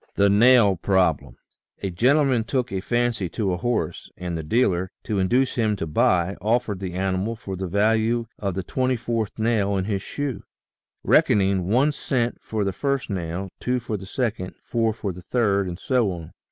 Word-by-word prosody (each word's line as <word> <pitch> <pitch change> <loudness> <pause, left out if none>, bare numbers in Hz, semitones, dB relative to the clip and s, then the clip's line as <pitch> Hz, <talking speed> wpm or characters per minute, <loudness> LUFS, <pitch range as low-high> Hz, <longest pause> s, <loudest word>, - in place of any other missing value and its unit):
THE 100 0 +4
NAIL 110 -2 +5
PROBLEM 90 -3 +1 0.5
GENTLEMAN 125 - +2
took 125 0 -1
a 95 -1 -2
fancy 120 -4 0
to 95 0 -1
a - - -1
horse, 120 +5 -2
and 90 -1 -4
the 80 - -3
dealer, 95 0 +1
to 105 -4 -1
induce 125 +8 +2
him 110 -3 +1
to 85 - -3
buy, 85 +4 +2
offered 110 -2 0
the 95 -2 -5
animal 95 +4 -1
for 100 -4 -6
the 95 0 -4
value 110 +4 +2
of 100 -3 -2
the 95 - -2
twenty 130 +4 0
fourth 115 -2 -3
nail 110 -3 +1
in 95 - -1
his 100 -2 -1
shoe, 140 +3 -4 0.6
reckoning 95 -3 +3
one 130 +9 +3
cent 125 -4 -2
for 110 -2 -2
the 100 -1 -1
first 140 -2 -1
nail, 90 +1 -3
two 125 0 0
for 115 -2 -4
the 95 -2 -7
second, 110 -6 -3
four 115 -2 0
for 105 -2 -4
the 90 - -10
third, 100 -2 +1
and 85 -1 -5
so 120 -1 +1
on. 85 -3 -8
105 Hz, 180 wpm, -24 LUFS, 95-120 Hz, 0.6 s, NAIL